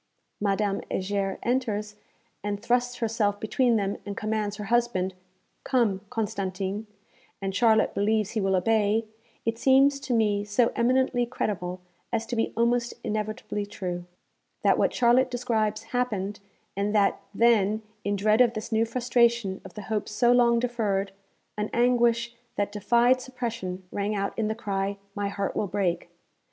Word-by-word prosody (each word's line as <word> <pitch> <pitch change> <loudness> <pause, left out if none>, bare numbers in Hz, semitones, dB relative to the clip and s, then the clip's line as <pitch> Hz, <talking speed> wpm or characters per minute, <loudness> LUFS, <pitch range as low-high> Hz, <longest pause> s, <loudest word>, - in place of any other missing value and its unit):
Madame 200 0 0
Heger 195 0 -1
enters, 215 -4 -1 0.5
and 205 -1 -2
thrusts 245 +2 +1
herself 220 -3 0
between 235 +3 +2
them, 200 -2 0
and 200 -1 -6
commands 215 -1 -1
her 210 - -5
husband, 215 -4 +1 0.5
'Come, 225 -7 +1
Constantin,' 200 -2 -3 0.5
and 195 -1 -3
Charlotte 220 0 +4
believes 215 0 +1
he 220 - -1
will 195 -1 +2
obey, 215 +3 +2 0.4
it 230 0 -1
seems 275 +2 +5
to 255 -3 -1
me 210 -2 +2
so 210 +3 +2
eminently 245 0 +2
credible 180 -6 -3 0.3
as 225 -1 -1
to 240 - -4
be 225 - 0
almost 235 +1 +1
inevitably 215 0 -3
true, 180 -4 -5 0.6
that - - +4
what - - +3
Charlotte 250 +1 +4
describes 225 -3 -1
happened, 210 -6 -2 0.4
and 200 +2 -1
that 200 -2 +3
then, 220 -2 +3 0.2
in 205 0 0
dread 215 +3 +3
of 240 -2 +4
this 215 +2 -5
new 225 +1 +3
frustration 235 -4 +1
of 190 - -12
the 210 - -6
hope 215 0 -2
so 240 +3 +3
long 240 -1 +5
deferred, 215 -5 0 0.5
an 210 - -1
anguish 235 -1 +2 0.2
that 205 0 -1
'defied 240 +5 +3
suppression' 230 -8 -5
rang 205 +1 -1
out 200 0 -1
in 220 -2 0
the 220 - -1
cry 200 -2 -2 0.2
'My 205 0 -2
heart 200 0 -3
will 210 - 0
break!' 190 -3 -1
215 Hz, 150 wpm, -27 LUFS, 200-235 Hz, 0.6 s, seems